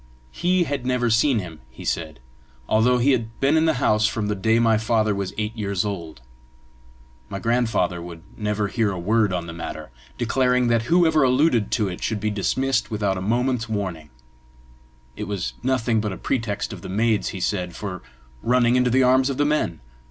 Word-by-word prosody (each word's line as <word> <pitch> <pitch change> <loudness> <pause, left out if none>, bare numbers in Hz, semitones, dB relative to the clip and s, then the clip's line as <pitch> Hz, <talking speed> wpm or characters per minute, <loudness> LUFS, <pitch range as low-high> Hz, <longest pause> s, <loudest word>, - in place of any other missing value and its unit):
He 180 - +1
had 145 -5 -3
never 125 -2 0
seen 120 +3 +3
him, 85 -6 -5
he 65 - -11
said, 80 -5 -3 0.5
although 120 +3 +3
he 130 +4 +3
had 115 -3 -2
been 140 +3 +3
in 160 0 +3
the 160 -2 +2
house 105 -4 +2
from 105 -2 -2
the - - +1
day 110 +3 +2
my 115 -2 +3
father 110 -1 +1
was 100 -2 -3
eight 110 +1 -2
years 100 -3 -1
old. 85 -9 -5 1.1
My 100 - -4
grandfather 115 -6 0
would 85 -1 -9
never 105 -1 -1
hear 110 0 0
a 95 - -4
word 105 +3 +1
on 90 -2 -2
the 85 - -7
matter, 85 -6 -7 0.3
declaring 125 +1 +2
that 115 -1 +3
whoever 165 -3 +4
alluded 130 -3 +3
to 105 -4 +1
it 90 -2 -6
should 110 -1 -1
be 105 +1 -1
dismissed 120 +5 0
without 105 -3 -1
a 95 - -4
moment's 120 +3 0
warning: 95 -8 -4 1.1
it - - -5
was 100 -4 -3
nothing 120 -3 +1
but 105 -1 -2
a 95 - -6
pretext 115 -3 -2
of - - -9
the - - -8
maids, 110 +2 +1
he 95 - -5
said, 90 -2 -2
for 95 -4 -6 0.4
running 120 0 +3
into 125 0 +3
the 130 +2 +3
arms 130 +1 +4
of 135 - -3
the 145 - +2
men! 145 - 0
110 Hz, 195 wpm, -23 LUFS, 100-125 Hz, 1.1 s, whoever